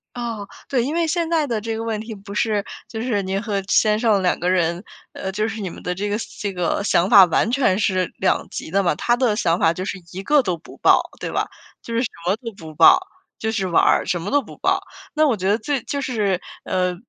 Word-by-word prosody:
哦， 230 -4 -4 0.2
对， 255 -4 +1
因 290 +6 -2
为 340 0 +2
现 335 0 0
在 325 -3 +2
的 230 -6 -2
这 225 +1 -3
个 225 - -4
问 225 -2 -2
题 220 0 -7
不 200 0 -10
是 210 -1 0 0.2
就 220 - -6
是 230 -4 0
您 190 +1 -2
和 210 -3 -2
先 215 0 +3
生 220 -4 +3
两 180 - +1
个 175 - 0
人， 175 0 +1 0.3
呃， 190 - -4
就 215 +3 -1
是 220 0 -5
你 190 - -3
们 - - -11
的 180 - -1
这 200 +3 -3
个 205 - 0 0.2
这 205 -2 -1
个 180 +1 -1
想 185 -2 +2
法 195 -3 +9
完 180 +5 +1
全 250 -8 +2
是 185 -4 0
两 190 - +1
极 - - -7
的 195 +2 +3
嘛， 175 -5 +1
他 240 +10 +1
的 240 -4 +1
想 175 -5 +1
法 165 - +4
就 185 +2 -5
是 195 - -4
一 190 +2 -6
个 295 +5 +4
都 180 -8 -2
不 165 - -15
报， - - +5 0.2
对 - - -4
吧？ - - -1 0.4
就 230 - -6
是 230 - +1
什 250 - -1 0.2
么 185 +3 +2
都 230 -1 -7
不 160 -2 -10
报， 160 +2 +7 0.4
就 220 - -2
是 195 -4 -1
玩 170 - +3
儿， - - +3
什 175 - -1
么 190 - -4
都 285 +1 +3
不 240 - -13
报。 - - +1 0.3
那 310 0 +3
我 245 -6 +1
觉 190 0 -2
得 205 +2 +3
最 275 +3 -1
就 280 -1 -3
是， 210 -8 0 0.2
呃， 180 -1 0
205 Hz, 275 characters per minute, -21 LUFS, 185-235 Hz, 0.4 s, 法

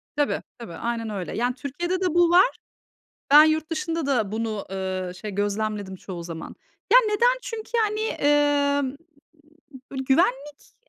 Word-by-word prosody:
Tabii, 290 0 0 0.2
tabii 230 -8 -8
aynen 230 -1 -3
öyle. 195 -4 -5
Yani 245 +2 0
Türkiye'de 345 +8 -3
de 370 - +1
bu 345 0 +4
var. 370 +8 +5 0.8
Ben 295 +1 +10
yurt 315 0 +1
dışında 330 -1 -2
da 235 -8 0
bunu, 220 -2 -3
ııı, 185 -1 -4
şey 210 +3 -7
gözlemledim 205 0 -2
çoğu 180 -2 -8
zaman. 165 -1 -8 0.4
Ya - - +10
neden? 475 +4 +3
Çünkü 455 -3 -7
yani, 430 -1 +1 0.8
ımm, 270 0 -4 0.9
böyle 265 -1 -4
güvenlik 270 +2 0
265 Hz, 145 wpm, -24 LUFS, 205-335 Hz, 0.9 s, Ben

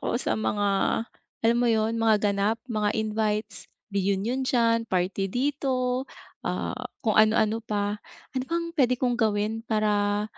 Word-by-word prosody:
ako - - -1
sa - - -1
mga, 205 -1 0 0.8
alam 230 +1 +4
mo 240 - +3
'yon? 225 0 +1
Mga 225 -1 +4 0.2
ganap, 200 +3 +1 0.2
mga 210 -1 +1
invites, 215 -1 -2 0.2
reunion 200 +6 0
diyan, 230 -3 +2
party 190 +2 0
dito, 255 +1 0 0.4
ah, - - -2 0.3
kung 220 - +3
ano-ano 220 0 +3
pa. 205 -1 -2 0.3
Ano 260 - -1
pang 335 0 -2
puwede 255 -6 +2
kong 250 0 +1
gawin 215 0 +1
para, 210 -2 +1
220 Hz, 140 wpm, -26 LUFS, 205-245 Hz, 0.8 s, alam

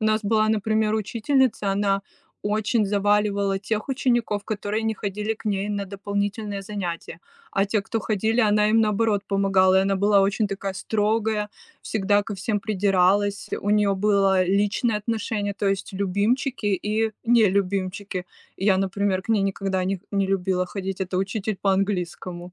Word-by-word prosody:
У - - -1
нас 215 0 +2
была, 215 +1 +2
например, 215 0 +1
учительница, 230 0 +1
она 195 0 +1 0.4
очень 215 +1 +1
заваливала 200 -1 +1
тех 215 +3 -3
учеников, 240 -6 0
которые 215 +1 -2
не 220 0 0
ходили 210 +2 -3
к 220 - -17
ней 200 -1 -1
на 205 -1 -2
дополнительные 200 +1 -3
занятия, 190 -6 -5 0.3
а 195 - +1
те, 205 0 0
кто 225 +1 -2
ходили, 220 +3 0
она 210 -2 +3
им, 225 - +4
наоборот, 210 -1 +1
помогала. 195 -1 +3
И 190 - +4
она 195 0 +1
была 200 0 +4
очень 205 +2 +1
такая 195 -1 -4
строгая, 215 +1 0 0.3
всегда 205 -1 +1
ко 205 - -6
всем 205 +2 -2
придиралась, 200 0 +1
у 205 - -4
нее 205 -1 +3
было 195 -2 +3
личное 205 +4 +1
отношение, 210 -1 -2
то 200 - -2
есть 195 +1 -2
любимчики 205 +6 0
и 210 +3 0
нелюбимчики. 200 -3 +1 0.3
И 195 - -5
я, 195 -2 +4
например, 195 0 0
к - - -18
ней 220 -3 +3
никогда 195 -1 -1
не 190 -1 -2
не 195 -1 +1
любила 190 -1 0
ходить, 190 +1 -5
это 185 0 -2
учитель 200 +2 -2
по 195 -1 +2
английскому. 180 -2 -3
205 Hz, 160 wpm, -24 LUFS, 195-215 Hz, 0.4 s, им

